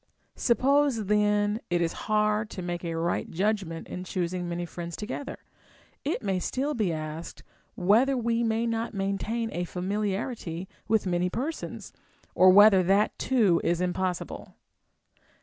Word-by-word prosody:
Suppose 265 -1 +2
then 210 +1 +2
it 175 - +1
is 170 -1 0 0.2
hard 215 0 +2
to 185 - -6
make 175 0 -4
a 165 -1 -3
right 170 +1 -1
judgment 190 -3 -1
in 180 - -6
choosing 180 0 -3
many 175 0 -3
friends 170 -1 -6
together, 245 +6 -5 0.7
it 290 -2 -2
may 190 -2 0
still 275 +10 -1
be 215 -8 0
asked 155 +1 -6 0.3
whether 230 +9 +3
we 235 0 0
may 225 0 +1
not 230 -1 -2
maintain 210 +4 -2
a 175 - -2
familiarity 190 0 -3 0.2
with 220 -1 +2
many 180 0 +1
persons, 275 - -5 0.4
or 185 - +6
whether 200 0 +8
that 195 +4 +2
too 210 -10 +3
is 170 0 +1
impossible. 180 0 -3
200 Hz, 140 wpm, -27 LUFS, 175-225 Hz, 0.7 s, whether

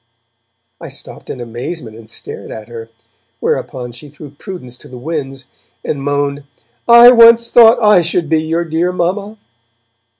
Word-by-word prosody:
I - - -8
stopped - - -9
in - - -6
amazement 120 +1 -7
and 110 -1 -14
stared - - -9
at 110 +1 -9
her, 115 -1 -9 0.5
whereupon 125 -1 -3
she 120 +5 -12
threw 145 0 -13
prudence 145 - -10
to - - -15
the 130 - -11
winds, 135 -1 -6 0.4
and 140 - -3
moaned: 145 0 -2 0.4
'I 235 +1 +9
once 235 -1 +6
thought 230 0 +7
I 210 -4 +5
should 170 0 -1
be 160 +1 +1
your 165 +2 -2
dear 165 +2 -1
mamma.' 195 +4 -3
155 Hz, 155 wpm, -15 LUFS, 130-180 Hz, 0.5 s, I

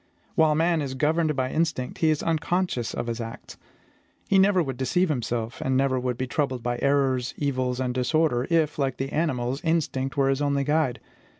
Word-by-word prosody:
While 155 -1 +3
man 165 0 +2
is 135 -2 -4
governed 155 +2 +1
by 130 -1 -1
instinct, 160 -6 -1
he 160 - +3
is 155 -1 +1
unconscious 165 -5 -1
of 120 - -3
his 115 0 -3
acts. 115 0 -8 0.7
He 195 - +4
never 190 -2 +4
would 135 -4 -4
deceive 180 +8 +1
himself, 120 -4 -2
and 130 -1 +1
never 135 -1 +2
would 125 -1 -2
be 130 - -1
troubled 130 -2 -2
by 120 0 -2
errors, 135 -3 +1
evils, 130 -3 -1
and 125 -1 -1
disorder, 130 0 +1
if, 160 -3 +1
like 135 -2 0
the 135 +1 -3
animals, 135 -4 -1
instinct 150 -4 -1
were 135 -1 +3
his 135 +1 0
only 140 -1 +1
guide. 145 -3 +1
135 Hz, 190 wpm, -25 LUFS, 125-155 Hz, 0.7 s, He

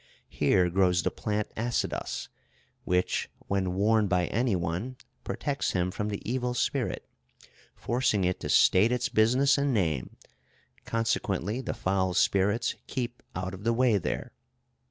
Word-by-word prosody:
Here 90 -2 +2
grows 90 -1 +3
the - - 0
plant 105 -2 -3
Assidos, 120 +2 -2 0.6
which, 90 0 0 0.2
when 95 -2 0
worn 105 +2 +3
by 90 -2 +2
any 115 -2 +1
one, 90 +9 -3 0.3
protects 145 -1 -2
him 90 0 0
from 105 +2 -3
the 100 -1 -5
evil 125 +1 -1
spirit, - - -1 0.7
forcing 120 -5 0
it 90 0 0
to - - -5
state 105 +6 +5
its 125 0 0
business 130 +6 +3
and 140 -3 +1
name; 80 - -1 0.7
consequently 115 -1 -1
the 130 - -4
foul 95 -1 0
spirits 100 +7 +2
keep 125 -2 -4
out 95 +1 -3
of 95 +1 -9
the 115 +1 +2
way 115 -3 +3
there. - - -3
105 Hz, 140 wpm, -28 LUFS, 95-120 Hz, 0.7 s, state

